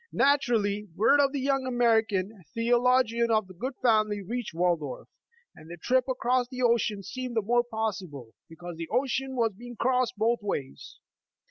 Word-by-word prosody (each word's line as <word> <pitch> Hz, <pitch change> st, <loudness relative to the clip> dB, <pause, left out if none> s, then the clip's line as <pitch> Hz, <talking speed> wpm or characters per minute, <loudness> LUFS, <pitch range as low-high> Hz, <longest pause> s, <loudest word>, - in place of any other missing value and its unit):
Naturally, 225 Hz, -7 st, +1 dB
w^ord 285 Hz, +7 st, +5 dB
of 275 Hz, -, +1 dB
the 280 Hz, -, -3 dB
young 270 Hz, 0 st, 0 dB
American 220 Hz, -5 st, +1 dB
theo 235 Hz, +1 st, +2 dB
logian 240 Hz, -2 st, +2 dB
of 200 Hz, -5 st, -1 dB
good 260 Hz, +3 st, -3 dB
family 215 Hz, -3 st, +3 dB
reached 240 Hz, +4 st, -4 dB
Waldorf, 170 Hz, -4 st, -1 dB, 0.5 s
and 155 Hz, -, -14 dB
the 175 Hz, -, -8 dB
trip 255 Hz, +8 st, +1 dB
across 250 Hz, 0 st, +1 dB
the 255 Hz, 0 st, -5 dB
ocean 230 Hz, -4 st, +1 dB
seemed 255 Hz, +3 st, -6 dB
the 225 Hz, -, +2 dB
more 240 Hz, +3 st, +2 dB
possible, 195 Hz, -, -5 dB, 0.2 s
because 170 Hz, +1 st, -9 dB
the 165 Hz, -1 st, -6 dB
ocean 265 Hz, 0 st, -1 dB
was 230 Hz, -3 st, +1 dB
being 240 Hz, +3 st, -10 dB
crossed 250 Hz, +1 st, +1 dB
both 230 Hz, +3 st, +1 dB
ways. 145 Hz, -10 st, -5 dB
230 Hz, 160 wpm, -27 LUFS, 200-250 Hz, 0.5 s, w^ord